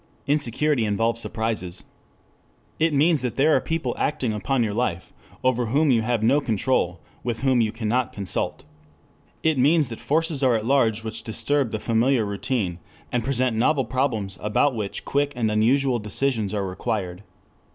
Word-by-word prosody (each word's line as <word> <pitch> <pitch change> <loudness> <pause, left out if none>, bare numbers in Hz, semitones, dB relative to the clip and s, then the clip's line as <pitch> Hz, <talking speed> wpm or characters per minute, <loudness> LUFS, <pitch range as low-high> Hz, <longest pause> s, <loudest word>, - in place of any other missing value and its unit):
Insecurity 145 -1 +1
involves 115 +2 0
surprises. 110 -7 -3 1.0
It 160 +1 +3
means 150 +1 +3
that 125 -4 -1
there 150 +3 +4
are - - +2
people 160 -7 -2
acting 125 -6 0
upon 120 +5 0
your 105 -2 -1
life, 100 -6 -2 0.3
over 125 -2 +1
whom 145 +5 +3
you 115 -3 +3
have 115 -1 -1
no 135 +6 +4
control, 110 -7 0 0.2
with 120 -2 -3
whom 130 -3 +3
you 110 -2 +1
cannot 115 +2 -1
consult. 100 -2 -3 0.8
It 160 -4 +2
means 145 +1 +4
that 115 - -7
forces 160 -1 0
are 130 -3 +4
at 110 -1 -2
large 115 -4 +2
which 110 0 -4
disturb 135 +4 0
the 110 - -3
familiar 115 +2 +1
routine, 100 -3 -2 0.3
and 120 -2 0
present 130 -2 0
novel 135 +4 +2
problems 115 -7 -2
about 105 +7 +2
which 105 -4 -5
quick 145 0 0
and 115 -3 0
unusual 125 +4 +2
decisions 110 0 -1
are 100 -2 -1
required. 95 -1 -3
120 Hz, 160 wpm, -24 LUFS, 110-135 Hz, 1.0 s, there